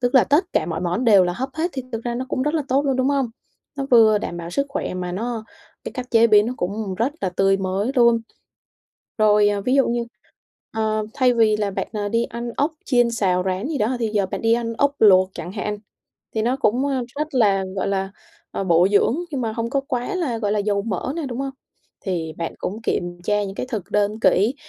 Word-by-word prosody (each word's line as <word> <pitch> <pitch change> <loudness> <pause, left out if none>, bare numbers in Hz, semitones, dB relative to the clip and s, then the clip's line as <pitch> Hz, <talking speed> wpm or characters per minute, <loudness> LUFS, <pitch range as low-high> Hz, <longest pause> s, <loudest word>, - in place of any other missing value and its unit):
Tức 245 +1 0
là 260 - +7
tất 295 +6 +3
cả - - +1
mọi 165 -1 -3
món 180 +8 -1
đều 200 -5 +6
là 175 - -1
hấp 260 +8 -3
hết 330 +3 -1
thì 265 - -3
thực 225 +1 -4
ra 240 0 -2
nó 255 +2 -3
cũng 260 - -1
rất 300 +3 0
là 310 - +1
tốt 275 +3 +2
luôn, 270 -2 +1
đúng 260 +1 +1
hông? 275 -3 +1 0.5
Nó 275 - -3
vừa 220 -3 +6
đảm 175 - -5
bảo 170 0 -6
sức 280 +9 0
khỏe 275 - -3
mà 180 -1 -4
nó 225 +3 -3 0.4
cái - - -5
cách 255 -1 -6
chế 230 0 +6
biến 210 -1 +5
nó 250 - -3
cũng 200 +1 -3
rất 235 +8 0
là 190 - 0
tươi 195 +2 +2
mới 195 +4 -1
luôn. 235 -2 +5 1.0
Rồi, 210 -1 +5
ờ, 205 -1 0
ví 250 +5 +1
dụ 275 -3 +4
như, 235 0 0 0.7
ờ, 215 -1 -1
thay 255 -3 +3
vì 220 -2 +4
là 205 -1 -1
bạn, - - -3
ờ, 205 -1 -2
đi 230 +2 +1
ăn 235 +1 -5
ốc 295 +3 +1
chiên 245 -2 +3
xào 185 -5 +1
rán 190 +6 -1
gì 310 -4 -2
đó, 230 +5 0
thì 225 - 0
giờ 205 -3 0
bạn - - -5
đi 225 - +3
ăn 230 -1 -2
ốc 285 0 +2
luộc 185 -3 +6
chẳng 175 +3 -6
hạn. 210 0 -3 0.6
Thì 220 - 0
nó 245 +4 +1
cũng, 260 +1 +1
ơ, 265 -3 -1
rất 300 -1 -3
là, 200 -5 +3
gọi 190 - -1
là, 195 0 -1 0.4
ờ, 195 - -3
bổ 175 +1 +4
dưỡng 205 +6 +3
nhưng 275 -4 -3
mà 225 -2 -2
không 230 0 -3
có 275 - +1
quá 245 +10 -2
là, 290 -11 -1
gọi 205 -2 -1
là, 210 - +1
dầu 200 -1 0
mỡ 220 +4 -3
nè, 330 - -2
đúng 245 -1 -5
hông? 275 0 -2 0.6
Thì 165 -4 -2
bạn 165 - -3
cũng 215 +4 -5
kiểm 175 -4 -2
tra 210 +1 +1
những 195 0 -6
cái 250 - -4
thực 210 -6 -4
đơn 210 +1 0
kỹ 220 +8 +3
220 Hz, 250 wpm, -22 LUFS, 195-255 Hz, 1.0 s, là